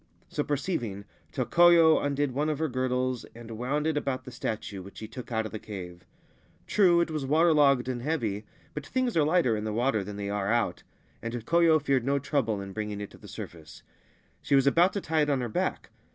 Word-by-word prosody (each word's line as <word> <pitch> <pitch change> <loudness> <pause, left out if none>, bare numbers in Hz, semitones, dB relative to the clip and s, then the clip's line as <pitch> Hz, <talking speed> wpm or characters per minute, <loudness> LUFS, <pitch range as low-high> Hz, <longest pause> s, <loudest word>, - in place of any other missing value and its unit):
So 150 - -1
perceiving 125 - -3 0.3
Tokoyo 170 -2 +5
undid 145 -1 0
one 145 +4 0
of 155 - -1
her 160 +2 0
girdles 130 -1 -1
and 115 -1 -10
wound 130 +7 -2
it 160 -1 +1
about 130 -3 -2
th< 125 - -9
statue, 110 -4 -4
which 100 +2 -12
she 110 - -7
took 125 +2 -9
out 110 -1 0
of 110 - -6
the 110 - -5
cave. 90 -5 -9 0.6
True, 175 -4 +4
it 170 - -1
wai 155 -3 -2
waterlogged 145 -3 +4
and 125 -2 -3
heavy; 120 -8 -2 0.3
but 150 - -5
things 250 - -1
are 160 - +4
lighter 155 -7 +3
in 105 - -3
th( 110 -1 -3
water 120 -3 +1
than 100 +1 -7
they 100 0 -4
are 100 0 -1
out, 115 -7 0 0.4
and 115 0 -5
Tokoyo 165 +7 +3
feared 135 -4 +1
no 140 +2 +1
trouble 135 -6 -1
ir 100 0 -7
bringing 105 0 -4
it 100 - -6
to - - -15
the - - -13
surface 80 -3 -10 0.3
— - - -37
she - - +1
was 135 -1 +4
about 170 +7 +4
to 200 - -2
tie 160 -2 +1
it 150 - +1
on 135 -3 +1
hei 120 - -3
back. - - -2
130 Hz, 220 wpm, -28 LUFS, 110-150 Hz, 0.6 s, Tokoyo